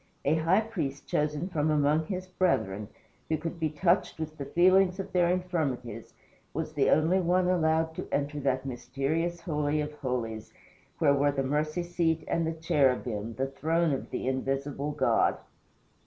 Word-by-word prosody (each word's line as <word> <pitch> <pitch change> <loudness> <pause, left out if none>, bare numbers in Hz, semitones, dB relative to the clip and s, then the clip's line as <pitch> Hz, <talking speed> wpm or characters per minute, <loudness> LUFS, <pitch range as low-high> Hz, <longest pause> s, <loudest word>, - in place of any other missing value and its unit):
A 145 - +4
high 165 +6 +3
priest 165 -12 -4
chosen 150 +3 -1
from 155 -4 0
among 150 +1 +2
his 185 -2 -3
brethren, 140 - 0 0.4
who 160 - +1
could 165 +2 -5
be 160 -1 +1
touched 170 +5 +1
with 155 -1 -4
the 140 -3 -6
feelings 185 +3 +4
of 195 - -5
their 175 -1 +3
infirmities, 145 - -2 0.4
was - - -3
the - - +2
only 165 +5 +4
one 180 0 +2
allowed 160 -2 +2
to - - -4
enter 145 +1 -1
that 130 -1 0
mysterious 145 +7 -2
Holy 150 -2 0
of 150 0 -3
Holies 120 -6 -4 0.5
where 145 -3 +4
were 145 +1 +3
the 135 -1 -1
mercy 155 +5 -1
seat 170 -2 0
and 165 -1 0
the 165 - -1
cherubim, 125 -8 0
the 135 - 0
throne 160 +4 0
of 135 - -4
the - - -3
Invisible 135 +2 -2
God. 145 -3 +2
155 Hz, 165 wpm, -29 LUFS, 135-170 Hz, 0.5 s, A